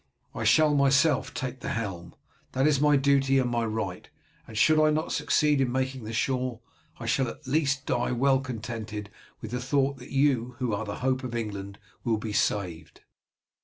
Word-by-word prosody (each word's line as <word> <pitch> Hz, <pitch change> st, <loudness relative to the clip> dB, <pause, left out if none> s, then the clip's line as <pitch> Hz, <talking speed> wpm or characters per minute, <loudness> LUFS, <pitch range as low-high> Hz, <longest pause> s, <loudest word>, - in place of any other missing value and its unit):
I -, -, -4 dB
shall 155 Hz, -1 st, +5 dB
myself 140 Hz, +1 st, +3 dB
take 130 Hz, 0 st, -5 dB
the -, -, -5 dB
helm. 90 Hz, -6 st, -5 dB, 0.4 s
That 130 Hz, +1 st, +2 dB
is 145 Hz, -3 st, +3 dB
my 150 Hz, -1 st, +5 dB
duty 135 Hz, -1 st, +3 dB
and 125 Hz, -2 st, +1 dB
my 120 Hz, -1 st, 0 dB
right, 110 Hz, -4 st, -4 dB, 0.4 s
and 110 Hz, -, -8 dB
should 155 Hz, +7 st, +5 dB
I 155 Hz, -, +5 dB
not 155 Hz, +1 st, -1 dB
succeed 150 Hz, -3 st, +2 dB
in 125 Hz, -2 st, +1 dB
making 130 Hz, -2 st, -2 dB
the 110 Hz, -, -5 dB
shore, 125 Hz, 0 st, -1 dB, 0.4 s
I 115 Hz, -, -6 dB
shall 125 Hz, +3 st, +1 dB
at -, -, -9 dB
least 140 Hz, 0 st, 0 dB
die 125 Hz, -1 st, 0 dB
well 135 Hz, +2 st, +3 dB
contented 110 Hz, -5 st, -6 dB, 0.3 s
with 110 Hz, -, -7 dB
the 125 Hz, 0 st, -2 dB
thought 135 Hz, +1 st, +1 dB
that -, -, -12 dB
you 130 Hz, -3 st, +1 dB
who 125 Hz, -4 st, -1 dB
are 105 Hz, +2 st, -2 dB
the 100 Hz, +1 st, -6 dB
hope 130 Hz, 0 st, +1 dB
of 120 Hz, -2 st, -4 dB
England 100 Hz, -3 st, -5 dB, 0.3 s
will 115 Hz, -2 st, +1 dB
be 110 Hz, 0 st, -5 dB
saved." 90 Hz, -7 st, -2 dB
130 Hz, 190 wpm, -27 LUFS, 110-140 Hz, 0.4 s, shall